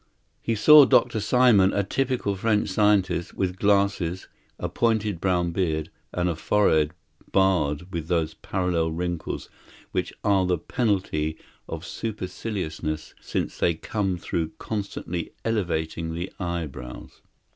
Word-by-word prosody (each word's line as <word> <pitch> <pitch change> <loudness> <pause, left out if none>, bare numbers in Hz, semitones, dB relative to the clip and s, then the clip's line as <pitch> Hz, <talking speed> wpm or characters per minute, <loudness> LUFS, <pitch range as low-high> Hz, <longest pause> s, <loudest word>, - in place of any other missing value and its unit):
He 115 - 0
saw 150 +7 +9
Dr. 120 -4 +3
Simon, 105 -3 +4
a 100 - +1
typical 125 -1 -1
French 105 +2 +1
scientist, 100 -3 +2
with 95 -1 -2
glasses, 100 -3 +1 0.3
a - - -3
pointed 110 -6 0
brown 90 -2 +1
beard, 80 -3 -1 0.2
and 90 0 0
a 85 - 0
forehead 80 -3 +2 0.4
barred 90 -3 +1
with 80 -2 -3
those 80 -3 0
parallel 90 -4 -1
wrinkles 85 0 -3 0.4
which - - -1
are 95 -3 +3
the 90 -1 +2
penalty 85 -6 -1 0.3
of 80 +1 -5
superciliousness, 90 -7 -4
since - - -3
they 85 - +2
come 95 +2 -2
through 85 -2 -3
constantly 100 -5 -4
elevating 80 -6 -1
the 85 +3 -5
eyebrows. 80 -9 -5
90 Hz, 125 wpm, -25 LUFS, 80-105 Hz, 0.4 s, saw